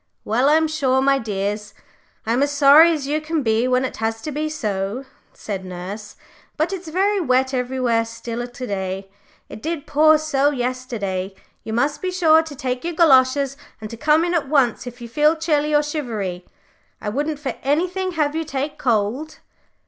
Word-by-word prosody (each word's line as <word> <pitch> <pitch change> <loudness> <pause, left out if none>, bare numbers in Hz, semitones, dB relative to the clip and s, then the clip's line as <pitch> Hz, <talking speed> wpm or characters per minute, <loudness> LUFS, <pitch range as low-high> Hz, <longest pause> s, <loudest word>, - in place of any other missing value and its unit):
"Well, 245 +6 +2
I'm 315 +1 +4
sure, 275 -4 +1
my 275 +1 +3
dears, 210 -1 -3 0.5
I'm 230 +4 +1
as 285 - +2
sorry 290 +3 +7
as 300 -4 -2
you 300 +2 -1
can 310 -1 -2
be 225 +1 +2
when 255 +1 +2
it - - -5
has 225 0 -2
to 305 - -4
be 305 +2 -2
so," 210 -2 -3 0.3
said 195 -3 -6
nurse. 185 +4 -7 0.4
"But 315 +5 0
it's 370 -2 -6
very 390 +5 +1
wet 260 -2 +1
everywhere 250 -2 0
still 230 +1 -6
to 245 +1 -7
day. 195 -2 -4 0.4
It 215 - -10
did 325 0 -4
pour 310 +1 +5
so 290 -2 +1
yesterday. 240 -8 -3 0.3
You 220 - -5
must 280 +6 0
be 370 - -1
sure 325 -4 +4
to 320 -3 -9
take 255 -1 -3
your 340 0 -3
goloshes, 275 -3 +4 0.2
and 215 -1 -8
to - - -6
come 305 +5 +3
in 350 - -1
at 310 -6 0
once 260 -5 +2
if 245 0 -9
you 235 - -6
feel 300 +6 +3
chilly 305 -2 0
or 295 0 +4
shivery. 220 - -4 0.5
I 210 - -4
wouldn't 295 +7 -2
for 275 -4 -4
anything 365 +6 0
have 300 -2 0
you 325 - -1
take 285 -1 -4
cold." 245 +6 -1
270 Hz, 185 wpm, -21 LUFS, 230-310 Hz, 0.5 s, sorry